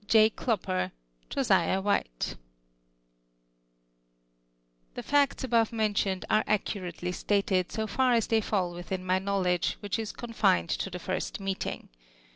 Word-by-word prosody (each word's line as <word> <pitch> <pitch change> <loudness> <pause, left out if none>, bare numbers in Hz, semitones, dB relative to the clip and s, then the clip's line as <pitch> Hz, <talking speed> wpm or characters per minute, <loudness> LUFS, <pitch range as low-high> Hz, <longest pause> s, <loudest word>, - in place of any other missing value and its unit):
Jno. 220 0 +5
Clopper, 95 - -1 0.4
Josiaii 190 0 +2
While 205 0 +3 2.9
The - - -5
facts 285 -2 +2
alHJve 230 -3 +2
mentioned, 205 -4 0
are 215 - +3
accurately 180 -4 -2
stated, 190 -1 0
so 220 +1 -2
fu" 215 +5 -2
as 245 -4 +4
they 225 -1 +2
fill 185 -5 -1
within 180 +1 -5
my 185 0 +2
knowledgx*, 190 -3 +1
which 205 +2 -4
is 220 -2 -3
confined 215 -7 +1
to - - -1
tlie 180 -1 -6
first 190 +6 -3
meeting 195 -1 -4
200 Hz, 125 wpm, -29 LUFS, 185-220 Hz, 2.9 s, Jno